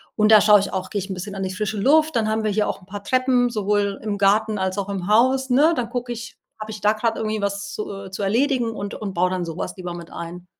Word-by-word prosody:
und 215 0 +3
da 215 - +9
schaue 210 -1 +7
ich 200 - -4
auch 185 -1 -3
gehe 205 - -2
ich 195 +1 -6
'n - - -2
bisschen 195 +2 -6
an 195 - -3
die 185 - -3
frische 215 +3 -3
Luft, 310 +9 +3
dann 220 -2 +1
haben 220 0 0
wir 215 - 0
hier 210 +1 +1
auch - - -3
'n - - -17
paar 200 +1 -8
Treppen, 255 0 +2
sowohl 205 -2 0
im 210 -2 -2
Garten, 210 +2 +2
als 190 0 -2
auch 200 0 -3
im 190 -2 -4
Haus, 260 +5 +3
ne? 290 +7 +4
Dann 235 -5 -2
gucke 245 0 -4
ich: 235 0 -9 0.2
habe 215 0 -6
ich 215 -2 -8
da 210 +1 +4
grad 225 +1 -1
irgendwie 215 -1 -2
was 200 0 -3
zu, 210 - -5 0.2
äh, 190 - -11
zu 195 - -4
erledigen?“ 240 +3 +1
und 205 -2 -6
und 200 -3 -5
baue 180 +1 +2
dann 185 -1 -2
sowas 165 +1 -5
lieber 180 -2 -5
mit 170 -1 -9
ein. 175 +1 -8
210 Hz, 285 wpm, -22 LUFS, 195-230 Hz, 0.2 s, da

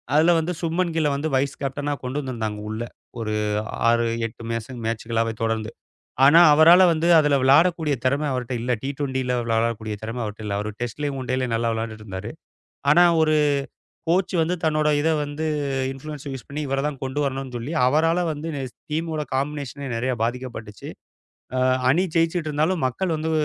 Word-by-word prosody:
அதுல 160 +3 +5
வந்து 160 +2 -2
சுப்மன்கில்ல 165 -2 0
வந்து 150 +3 -2
வைஸ் 135 +1 0
கேப்டனா 145 +1 -2
கொண்டு 130 +3 -2
வந்திருந்தாங்க 110 -6 -4
உள்ள, 110 +1 -4 0.4
ஒரு 110 -1 -2 0.6
6, 115 0 +3 0.2
8 115 +1 -13
மேஸ 115 +2 -4
மேச்சுகளாவே 115 0 -1
தொடர்ந்து. 110 0 -1 0.5
ஆனா, 150 +5 +8
அவரால 165 +5 +7
வந்து 160 +1 0
அதுல 150 -2 +3
விளயாடக்கூடிய 155 +2 +4
திறம 140 +3 +1
அவர்ட்ட 125 0 -3
இல்லை. 125 +1 0
டி-டுவென்டில 130 -2 -2
விளையாடக்கூடிய 115 -1 -1
திறம 115 +2 -4
அவர்ட்ட 105 +1 -7
இல்ல. 100 -1 -2
அவரு 105 +1 -3
டெஸ்ட்லயும், 140 +4 -3
ஒன் 130 - -8
டேலயும் 130 -2 -1
நல்லா 115 0 0
விளயாண்டுட்டு 110 -1 -5
இருந்தாரு. 95 +4 -6 0.6
ஆனா 170 +4 +7 0.2
ஒரு 155 0 +3 0.8
கோச் 180 +2 +2
வந்து 165 +2 +1
தன்னோட 155 -1 +2
இத 150 +2 +1
வந்து 145 +2 -4 0.5
இன்ஃபுளூயென்ஸ 145 +1 -8
யூஸ் 130 -4 -7
பண்ணி 145 +2 -5
இவரத் 135 +1 -1
தான் 145 -2 -6
கொண்டு 135 +2 -2
வரணும்னு 135 -1 -3
சொல்லி 120 +6 -5
அவரால 165 +6 +3
வந்து, 155 +2 -6 0.2
ஸ் - - -37 0.2
டீமோட 160 0 -2
காம்பிநேஷனே 140 -1 -3
நெறைய 125 +3 -1
பாதிக்கப்பட்டுச்சு. 115 -4 -5 0.7
அ, - - +1 0.3
அணி 165 +8 +3
ஜெயிச்சிட்டு 165 -1 +1
இருந்தாலும் 155 +4 +1
மக்கள் 170 +7 -2
வந்து 160 +1 -2
135 Hz, 160 wpm, -23 LUFS, 115-155 Hz, 0.8 s, ஆனா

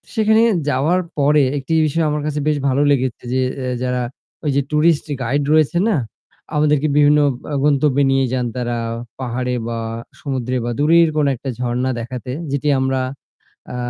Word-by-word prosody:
সেখানে 220 0 +4 0.3
যাওয়ার 155 +7 +2 0.2
পরে 145 0 +4
একটি 140 +4 -3
বিষয় 160 +2 0
আমার 150 0 -1
কাছে 150 -1 -2
বেশ 150 -1 +2
ভালো 135 +2 +1
লেগেছে 130 -3 0
যে 130 - +1 0.2
এ্যা 125 -1 -2
যারা 125 0 -1 0.4
ওই 145 - +2
যে 140 - +3
টুরিস্ট 150 0 +3 0.2
গাইড 140 +5 0
রয়েছে 155 +2 +3
না 210 - +2 0.6
আমাদেরকে 150 0 +2
বিভিন্ন 150 0 +5 0.3
আ - - 0
গন্তব্যে 145 -1 +3
নিয়ে 135 0 +2
যান 125 -1 0
তারা 120 -1 -2 0.4
পাহাড়ে 125 0 -2 0.2
বা 115 -1 -3 0.4
সমুদ্রে 130 -3 -2
বা 120 - -1
দূরের 165 +2 +5
কোনো 145 -2 +3
একটা 135 +2 -6
ঝরণা 125 +1 -1
দেখাতে 125 +2 -6 0.2
যেটি 140 +1 -1
আমরা 130 0 0 0.7
আ - - -5
140 Hz, 165 wpm, -19 LUFS, 130-150 Hz, 0.7 s, বিভিন্ন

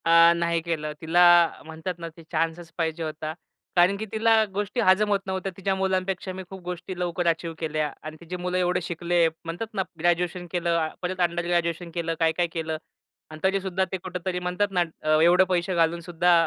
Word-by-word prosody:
अ, 170 0 +7
नाही 170 0 0
केलं. 160 -2 -3
तिला 170 +2 +4 0.4
म्हणतात 160 +3 -5
ना, 165 - -5
ते 165 - -12
चान्सच 165 +1 -1
पाहिजे 165 -1 -1
होता. 155 0 -4 0.4
कारण 180 +3 +5
की 220 - -4
तिला 225 0 +4
गोष्टी 205 +4 -2
हजम 190 +3 +4
होत 200 -1 +3
नव्हत्या. 190 0 -2
तिच्या 195 0 0
मुलांपेक्षा 190 0 -1
मी 190 0 -6
खूप 190 -1 -9
गोष्टी 180 +1 -6
लवकर 175 0 -1
अचीव्ह 165 0 0
केल्या 155 -2 -1
आणि 155 0 -7
तिची 170 +1 -6
मुलं 180 0 -2
एवढे 180 0 +1
शिकले, 170 0 +1 0.2
म्हणतातना 195 +5 -3 0.2
ग्रॅज्युएशन 175 +1 0
केलं, 170 -2 +1
परत 185 +1 -3
अंडर 175 0 +1
ग्रॅज्युएशन 170 0 0
केलं, 165 -1 -1
काय-काय 165 +1 +2
केलं 160 -1 -2 0.5
अन् 155 - -9
तरीसुद्धा 190 -1 +1
ते 190 - -1
कुठेतरी 180 0 -4
म्हणतात 180 +3 0
ना 180 -2 +2 0.2
अ, 155 0 +3
एवढे 175 +3 +6
पैसे 180 0 0
घालूनसुद्धा 170 +1 +2
175 Hz, 180 wpm, -25 LUFS, 165-185 Hz, 0.5 s, अ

